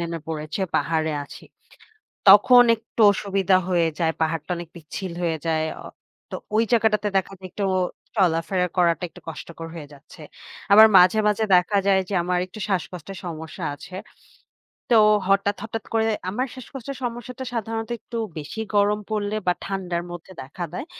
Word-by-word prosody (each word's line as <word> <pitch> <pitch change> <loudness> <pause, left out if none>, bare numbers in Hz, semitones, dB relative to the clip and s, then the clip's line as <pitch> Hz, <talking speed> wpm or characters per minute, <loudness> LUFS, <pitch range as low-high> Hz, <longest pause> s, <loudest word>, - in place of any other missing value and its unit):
নেমে 170 0 -3
পড়েছে। 155 +2 -4 0.2
পাহাড়ে 160 -1 0
আছি। - - -13 0.8
তখন 245 +5 +9
একটু 225 +1 -8
অসুবিধা 195 -1 +1
হয়ে 170 -3 +2
যায়। 165 -2 +1
পাহাড়টা 160 0 -2
অনেক 170 -1 -7
পিচ্ছিল 170 +3 -7
হয়ে 165 -2 0
যায়। 160 -1 +1 0.2
অ - - -13 0.5
তো - - -4 0.2
ওই 225 - +4
জায়গাটাতে 210 -2 +2
দেখা 195 0 0
যায় 185 0 -9
একটু 200 - -3 0.5
চলাফেরা 180 -1 +1
করাটা 170 -1 +2
একটু - - -15
কষ্টকর 165 +1 -8
হয়ে 160 -3 -8
যাচ্ছে। 145 +3 -15 0.5
আবার 215 +2 +10
মাঝে, 180 +3 +6
মাঝে 210 +1 +1
দেখা 200 +3 +2
যায় 195 -1 +4
যে, 205 - -3
আমার 180 +1 0
একটু 185 - -12
শ্বাসকষ্টের 185 0 -4
সমস্যা 160 -2 -6
আছে। 180 - -12 1.0
তো 235 - +6 0.3
হঠাৎ, 200 +1 +2
হঠাৎ 225 0 -5
করে 225 -1 +2 0.2
আমার 245 +7 -1
শ্বাসকষ্টের 265 +1 -8
সমস্যাটা 245 +1 -5
সাধারণত 225 0 -3
একটু 235 - -7 0.2
বেশি 155 +9 -6
গরম 205 +1 +3
পড়লে 210 -1 -2
বা 180 - +4
ঠান্ডার 180 -3 -3
মধ্যে 175 +2 -9
দেখা 135 +7 -7
দেয়। 185 - -5
190 Hz, 155 wpm, -23 LUFS, 165-215 Hz, 1.0 s, আবার